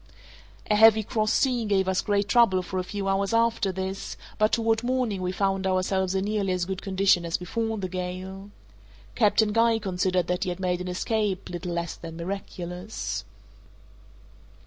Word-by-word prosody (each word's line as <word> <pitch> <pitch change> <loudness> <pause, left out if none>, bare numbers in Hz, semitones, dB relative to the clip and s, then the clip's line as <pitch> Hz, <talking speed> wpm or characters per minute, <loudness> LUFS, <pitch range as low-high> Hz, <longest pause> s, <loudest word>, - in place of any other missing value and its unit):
A - - +5
heavy 220 0 +7
cross 215 +1 0
sea 250 -4 +2
gave 195 -2 +1
us 190 0 +1
great 205 -1 0
trouble 205 -6 +4
for 185 +1 -3
a - - -1
few 200 +1 -4
hours 195 +3 +1
after 230 -3 +2
this, 190 +1 -5 0.2
but 215 0 +3
toward 225 -1 +2
morning 245 -5 -1
we 180 0 -1
found 195 0 0
ourselves 190 0 0
in 190 0 0
nearly 205 -3 0
as 180 -1 -1
good 190 0 -4
condition 190 -2 +2
as 170 0 -1
before 225 +5 -2
the 190 -2 -3
gale. 185 +2 -6 0.6
Captain 215 -1 +3
Guy 230 0 +4
considered 185 -3 0
that 180 +1 -1
he - - -2
had 175 +1 -4
made 180 -1 -1
an 180 - -5
escape 195 +1 -1
little 175 0 -4
less 170 0 -2
than 165 -1 -9
miraculous. 180 +1 -5
195 Hz, 170 wpm, -26 LUFS, 185-215 Hz, 0.6 s, heavy